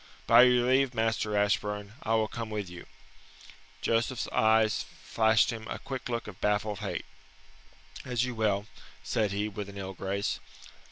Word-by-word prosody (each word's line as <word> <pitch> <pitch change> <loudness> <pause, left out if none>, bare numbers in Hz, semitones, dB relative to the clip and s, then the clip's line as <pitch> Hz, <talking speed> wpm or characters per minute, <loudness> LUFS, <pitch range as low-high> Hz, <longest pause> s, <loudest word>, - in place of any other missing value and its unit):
"By 115 +1 +8
your 125 -1 +4
leave, 130 0 +3
Master 110 -2 0
Ashburn, 105 0 0
I 115 - +1
will 110 -1 +2
come 115 -1 -5
with 105 -3 -3
you." 90 -1 -10 0.9
Joseph's 115 +2 0
eyes 110 0 +3 0.2
flashed 110 +1 +3
him 110 -1 -7
a - - -4
quick 130 -2 -6
look 120 -1 -2
of 100 -3 -10
baffled 105 0 0
hate. 105 -2 -4 1.0
"As 125 -2 0
you 125 - -4
will," 105 -3 0 0.4
said 105 - 0
he, 100 +1 -1
with 105 -1 -6
an 100 - -10
ill 95 -1 -5
grace. 100 +2 -2
110 Hz, 160 wpm, -29 LUFS, 105-115 Hz, 1.0 s, By